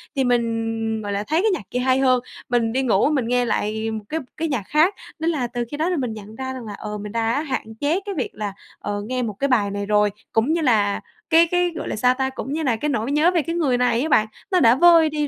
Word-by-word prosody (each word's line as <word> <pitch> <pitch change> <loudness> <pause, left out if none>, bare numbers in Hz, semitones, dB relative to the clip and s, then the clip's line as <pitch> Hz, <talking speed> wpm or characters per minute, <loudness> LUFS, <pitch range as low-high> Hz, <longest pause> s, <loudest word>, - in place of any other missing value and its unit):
thì 270 - +2
mình, 225 -2 0
gọi 205 -1 -4
là, 200 0 -1
thấy 320 +4 +2
cái 435 - +2
nhạc - - -2
kia 250 - -1
hay 260 +1 +2
hơn, 255 -2 +3 0.3
mình 230 -2 +1
đi 265 - +1
ngủ 230 +2 +3
mình 265 -6 0
nghe 245 0 +2
lại 220 0 -1
một 215 -1 -5
cái 320 - -1 0.2
cái 325 - -1
nhạc 260 -10 -2
khác. 315 +6 +3 0.3
Nên 325 +1 0
là 260 -6 -1
từ 240 0 -3
khi 290 - -4
đó 325 +4 0
thì 360 - 0
mình 250 -5 -2
nhận 215 0 -10
ra 260 +1 -4
rằng 255 -3 -7
là, 210 - -6
ờ, 210 +1 -6
mình 210 0 -7
đã 230 +5 0
hạn 260 -7 -4
chế 315 +6 +1
cái 400 -1 -4
việc 260 - -1
là, 205 -2 -4 0.3
ờ, 205 0 -3
nghe 255 0 -1
một 220 -3 -3
cái 280 - +1
bài 215 -7 +2
này 200 0 -3
rồi, 210 0 +3 0.2
cũng 235 +8 +2
như 335 - 0
là 215 -8 +2 0.3
cái 335 +1 +6
cái, 355 0 +2
gọi - - -5
là, - - -3
sao 250 +4 +3
ta? 265 0 0
Cũng 265 +1 -6
như 315 +1 -2
là 250 -5 +2
cái 295 +7 -2
nỗi 255 -2 -1
nhớ 305 +5 +4
về 340 -3 +2
cái 335 +3 -4
người 280 -8 +1
này 245 -1 +2
á 315 - -1
bạn, 215 -5 +4 0.2
nó 365 - +4
đã 230 -1 +6
vơi 330 +1 +6
đi 300 -1 -1
250 Hz, 285 wpm, -22 LUFS, 220-300 Hz, 0.3 s, cái